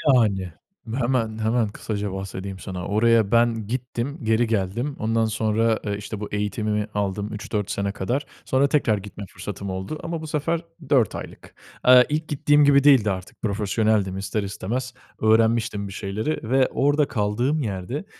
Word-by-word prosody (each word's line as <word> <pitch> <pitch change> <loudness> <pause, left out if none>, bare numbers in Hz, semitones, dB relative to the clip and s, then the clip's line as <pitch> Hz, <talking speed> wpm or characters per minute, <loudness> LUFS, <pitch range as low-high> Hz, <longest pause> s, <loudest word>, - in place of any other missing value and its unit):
Yani. 95 -7 +1 0.4
Hemen, 120 -4 0
hemen 110 +1 +1
kısaca 105 -1 -4
bahsedeyim 95 0 -6
sana. 90 -2 -5
Oraya 110 0 +3
ben 115 -2 +2
gittim. 125 +4 -3
Geri 110 +2 +2
geldim. 115 +6 -1
Ondan 115 +1 +1
sonra, 110 +1 +1
ııı, 100 -1 -1
işte 105 +1 -6
bu 105 - -5
eğitimimi 105 0 -1
aldım 105 +1 -2
3-4 105 -1 -3
sene 100 0 -1
kadar. 120 +8 -2 0.2
Sonra 135 +2 +3
tekrar 135 -7 +2
gitme 100 0 -8
fırsatım 100 +1 -6
oldu 95 +11 -4
ama 165 -1 -3
bu 160 - -6
sefer 155 +2 -1 0.3
4 125 -8 +3
aylık. - - -9 0.3
Iıı, 125 -1 +9
ilk 155 +2 -1
gittiğim 145 0 +3
gibi 140 -1 +5
değildi 130 -8 +6
artık 95 -1 -7
profesyoneldim 105 -2 +1
ister 95 +2 -2
istemez 120 +6 -4 0.3
öğrenmiştim 110 -1 +2
bir 95 - -8
şeyleri 110 +6 -3
ve 130 0 +4
orda 145 +1 +2
kaldığım 120 +5 0
yerde 110 - -4
110 Hz, 155 wpm, -24 LUFS, 100-130 Hz, 0.4 s, Iıı